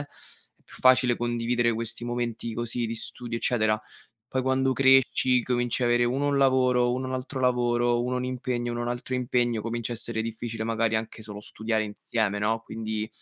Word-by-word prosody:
è 145 - -18
più - - -13
facile 125 -1 +5
condividere 120 0 0
questi 115 +1 -4
momenti 120 -1 -3
così 120 +1 -2
di 115 - -3
studio, 115 +1 -4
eccetera. 110 -3 +1 0.5
Poi 130 0 -1
quando 130 0 +2
cresci 130 -2 +4
cominci 120 0 0
avere 120 0 +3
uno 135 +4 0
un 140 -1 +1
lavoro, 125 -2 +3
uno 130 +1 -2
un 130 - -4
altro 130 +1 -5
lavoro, 120 -1 +2
uno 125 +1 -1
un 125 - -2
impegno, 125 -1 -2
uno 120 - -3
un 120 - -2
altro 120 +1 -3
impegno, 120 -2 +1
comincia 115 +1 -3
a - - -2
essere 115 0 -2
difficile, 115 0 -4
magari 115 0 +1
anche 110 0 -5
solo 105 -1 -8
studiare 110 +1 -2
insieme, 105 0 -2
no, 110 +2 +1
quindi 110 -1 -4
120 Hz, 180 wpm, -26 LUFS, 115-125 Hz, 0.5 s, facile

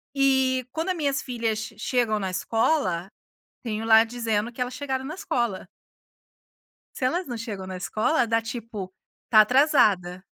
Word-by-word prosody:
E 265 -2 +2
quando 325 +5 -3
a - - +2
minhas 280 -5 -1
filhas 230 -3 -2 0.2
chegam 230 -2 0
na 190 -2 -3
escola, 190 - 0 0.5
tenho 220 -2 -3
lá 225 0 +7
dizendo 225 -1 -2
que 250 - -11
elas 250 0 -2
chegaram 265 -1 -3
na 305 - -5
escola. 240 - -2 1.3
Se 255 - -1
elas 345 +6 0
não 240 -2 -4
chegam 205 -5 -6
na 185 -1 -5
escola 225 - +1
dá 225 0 +2
tipo, 225 -5 -7 0.4
tá 215 -2 +8
atrasada. 210 - +3
235 Hz, 150 wpm, -25 LUFS, 215-265 Hz, 1.3 s, tá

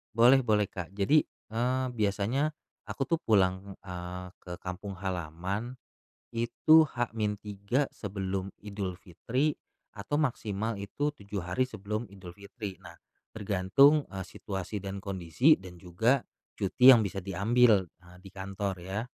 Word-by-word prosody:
Boleh, 125 +4 +7
boleh 105 -3 +2
Kak. 90 -1 -7
Jadi, 140 +10 +4 0.3
eee, 125 +3 0
biasanya 110 +7 0 0.4
aku 135 - -2
tuh 165 -1 +1
pulang, 95 -2 +1
eee, 90 0 -6
ke 90 -1 -7
kampung 95 +2 -6
halaman 95 +6 -4 0.6
itu 120 +7 +5
H-3 105 +1 -2
sebelum 95 -2 -3 0.2
Idul 100 -3 -4
Fitri 130 - -1 0.4
atau 100 +8 -3
maksimal 115 -6 -1
itu 145 +9 -2
7 100 -3 -6
hari 90 +9 0
sebelum 105 +1 -4
Idul 90 -3 -11
Fitri. 100 -1 -8
Nah, - - -12 0.4
tergantung, 110 +9 +4
eee, 95 -1 -5
situasi 95 +2 -5
dan 100 0 -5
kondisi 95 - +3
dan 90 -2 -11
juga 110 +10 +1 0.3
cuti 110 +6 +4
yang 115 - +4
bisa 95 0 -3
diambil, 105 +1 +3
eee, 90 +1 -19
di 95 - -12
kantor 95 0 -3
ya. 95 +4 -3
100 Hz, 130 wpm, -29 LUFS, 95-120 Hz, 0.6 s, Boleh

